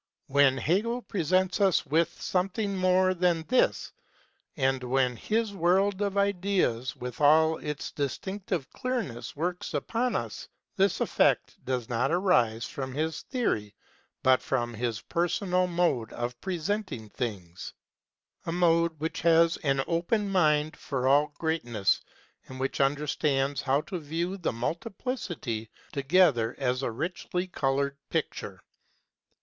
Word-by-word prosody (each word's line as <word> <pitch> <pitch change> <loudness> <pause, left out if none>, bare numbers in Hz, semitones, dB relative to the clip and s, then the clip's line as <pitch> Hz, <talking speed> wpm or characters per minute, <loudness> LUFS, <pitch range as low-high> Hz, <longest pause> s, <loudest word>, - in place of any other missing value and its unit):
When 135 -1 +4
Hegel 225 - 0
presents 185 +1 +1
us 195 -3 +3
with 160 +4 +1
something 195 +2 -1
more 185 0 +3
than 175 -2 +1
this 255 - +2 0.7
and 135 -2 +1
when 125 0 +1
his 220 - -1
world 190 +2 +2
of 200 -1 -1
ideas 190 - +1
with 125 +2 -7
all 160 +2 +5
its 150 -2 -5
distinctive 175 +3 -3
clearness 230 - -4
works 175 +2 -3
upon 230 - -1
us, 115 -3 -4 0.3
this - - +2
effect - - +1
does 125 -3 -2
not 125 +3 0
arise 125 - +2
from 130 -1 -5
his 160 +1 -2
theory 110 - -2 0.5
but 130 0 +5
from 120 -3 -1
his 115 -1 -2
personal 180 +2 0
mode 170 -10 0
of 120 0 -4
presenting 185 - -3
things 95 -8 -5 0.7
a - - 0
mode 170 -2 +2
which 160 +2 -3
has 165 0 +4
an 135 -3 0
open 195 +5 0
mind 155 -4 +2
for 130 -2 -2
all 145 +2 +5
greatness, 120 -11 0 0.5
and 130 0 -9
which 135 +1 -1
understands 140 0 +1
how 140 +1 +2
to 180 +2 -5
view 165 +5 -3
the 180 -4 -2
multiplicity 155 - -4 0.2
together 140 -5 +3
as 125 -1 0
a 135 - -1
richly 180 +7 -3
coloured 140 -4 -1
picture. - - -3
160 Hz, 130 wpm, -28 LUFS, 130-185 Hz, 0.7 s, all